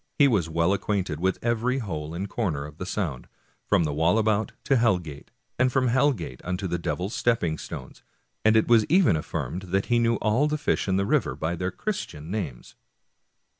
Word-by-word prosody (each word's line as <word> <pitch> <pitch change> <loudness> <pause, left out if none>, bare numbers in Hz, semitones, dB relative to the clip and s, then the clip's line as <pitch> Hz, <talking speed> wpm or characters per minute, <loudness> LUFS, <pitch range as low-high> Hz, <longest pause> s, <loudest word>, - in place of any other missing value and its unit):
He 145 - +6
was 100 - +1
well 85 +3 +2
acquainted 95 -6 -1
with 95 +1 +1
every 120 +2 +1
hole 80 - -4
and 95 +3 -3
corner 85 -10 -2
of 75 +1 -12
the 90 - -4
Sound, 85 -11 -3 0.4
from - - +3
the 75 -2 -1
Walla 80 +9 +3
bout 110 0 +1
^ - - -46
to 135 - +2
Hell 115 -5 +4
Gate, 75 -5 -10 0.3
and 130 0 +3
from 130 -1 +2
Hell 130 +4 +4
Gate 80 - -7
unto 90 +2 -3
the 85 -1 -1
Devil's 90 +5 -3
Stepping 90 -10 0
Stones; - - -8 0.4
and 110 +1 +5
it 110 - +3
was 115 -2 +6
even 170 - +4
affirmed 80 +3 -3
that 95 +2 +1
he 120 - +4
knew 115 0 +2
all 115 +7 +2
the 150 0 -1
fish 145 -7 0
in 95 -1 +2
the 100 - +1
river - - +1
by 80 +2 -2
their 90 +2 -2
Christian 90 - -5
names. 95 - -5
100 Hz, 205 wpm, -26 LUFS, 85-115 Hz, 0.4 s, He